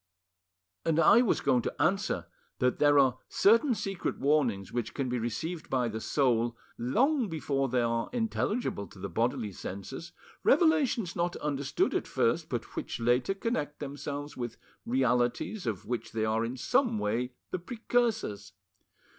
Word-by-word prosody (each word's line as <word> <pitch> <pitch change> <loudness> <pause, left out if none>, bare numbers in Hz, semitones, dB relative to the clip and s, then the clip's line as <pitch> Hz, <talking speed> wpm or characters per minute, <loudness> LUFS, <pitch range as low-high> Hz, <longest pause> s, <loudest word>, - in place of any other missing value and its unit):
"And 165 -1 +2
I 225 +7 +7
was 245 - +2
going 130 -3 +3
to - - -5
answer - - +1 0.3
that 125 0 +1
there 145 -1 +5
are 130 -2 +4
certain 230 +5 +4
secret 195 -3 -3
warnings 130 -10 +1
which 120 -2 -3
can 135 -3 -1
be 125 0 -1
received 155 +9 -4
by 125 -3 +1
the 110 0 -5
soul 120 -4 +1 0.2
long 245 - +1
before 140 -4 -1
they 125 0 +2
are 115 0 0
intelligible 225 - -1
to - - -16
the 95 +1 -5
bodily 115 +2 0
senses 100 - -7 0.3
revelations 285 - +3
not 175 0 0
understood 140 -2 -1
at - - -1
first, - - +1
but - - -4
which - - -4
later 125 +10 +2
connect 195 -9 -2
themselves 145 +1 -5
with 120 -2 -5 0.3
realities 125 - +1
of 105 -2 -3
which 115 0 -4
they 110 -1 0
are 110 +1 +1
in 120 +3 -3
some 240 - +2
way 125 - -1 0.2
the 185 - -2
precursors. 220 - -1
135 Hz, 155 wpm, -30 LUFS, 115-185 Hz, 0.3 s, I